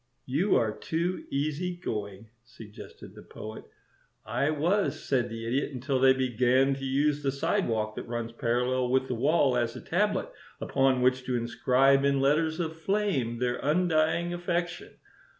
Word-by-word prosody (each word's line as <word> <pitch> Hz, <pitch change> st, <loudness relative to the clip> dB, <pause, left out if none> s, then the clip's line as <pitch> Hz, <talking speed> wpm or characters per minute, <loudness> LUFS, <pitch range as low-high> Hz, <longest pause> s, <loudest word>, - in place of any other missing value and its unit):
"You 155 Hz, +11 st, +1 dB
are 110 Hz, -2 st, +1 dB
too 170 Hz, +3 st, -2 dB
easy 155 Hz, +6 st, -2 dB
going," 105 Hz, -, -6 dB
suggested 110 Hz, -3 st, -12 dB
the -, -, -12 dB
Poet. 110 Hz, +1 st, -9 dB, 0.6 s
"I 125 Hz, +6 st, 0 dB
was," 155 Hz, 0 st, 0 dB
said 125 Hz, -5 st, 0 dB
the 115 Hz, 0 st, -6 dB
Idiot, 135 Hz, +5 st, -1 dB
"until 130 Hz, +1 st, -1 dB
they 130 Hz, 0 st, +6 dB
began 130 Hz, +1 st, +2 dB
to 135 Hz, 0 st, -6 dB
use 145 Hz, +2 st, +1 dB
the 140 Hz, -1 st, 0 dB
sidewalk 130 Hz, -, -1 dB
that -, -, -7 dB
runs 120 Hz, -1 st, -4 dB
parallel 125 Hz, +2 st, 0 dB
with 130 Hz, +1 st, +1 dB
the 125 Hz, -, -2 dB
wall 135 Hz, +1 st, +2 dB
as 120 Hz, -1 st, -1 dB
a -, -, -6 dB
tablet -, -, -1 dB, 0.3 s
upon 135 Hz, -2 st, +1 dB
which 130 Hz, 0 st, +2 dB
to 125 Hz, -, -1 dB
inscribe 130 Hz, +3 st, +2 dB
in 140 Hz, -1 st, +2 dB
letters 155 Hz, +4 st, +1 dB
of 160 Hz, -1 st, -3 dB
flame 165 Hz, -, -1 dB
their 125 Hz, 0 st, -1 dB
undying 165 Hz, +1 st, +1 dB
affection. 175 Hz, 0 st, -3 dB
135 Hz, 155 wpm, -28 LUFS, 120-155 Hz, 0.6 s, they